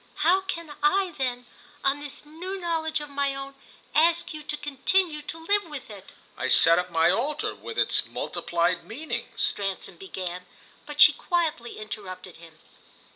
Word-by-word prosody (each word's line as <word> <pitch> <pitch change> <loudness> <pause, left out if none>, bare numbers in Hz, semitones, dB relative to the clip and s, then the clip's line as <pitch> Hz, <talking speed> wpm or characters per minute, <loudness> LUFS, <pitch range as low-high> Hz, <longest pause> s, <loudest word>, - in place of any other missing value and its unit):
"How 370 +3 +5
can 335 -5 -4
I 390 -2 +2
then, 245 -2 -1 0.4
on 275 +1 +2
this 290 0 -5
new 360 +6 -6
knowledge 320 -3 -1
of 295 - -7
my 280 -1 0
own, 275 0 -6 0.4
ask 335 +2 +3
you 305 - -6
to 295 0 -4
continue 300 +3 +1
to 310 +2 -5
live 410 +2 +3
with 295 -8 -8
it?" 195 -2 -12 0.2
"I 130 - -2
set 165 +5 +6
up 180 0 -3
my 165 0 +4
altar, 290 +10 -1
with 455 - -8
its - - +4
multiplied 175 +1 -1
meanings," 295 +8 -4
Stransom 195 -2 -2
began; 180 -1 -6 0.4
but 295 0 -8
she 300 - +11
quietly 315 -7 -1
interrupted 195 -4 -7
him. 165 -2 -15
290 Hz, 160 wpm, -26 LUFS, 195-330 Hz, 0.4 s, she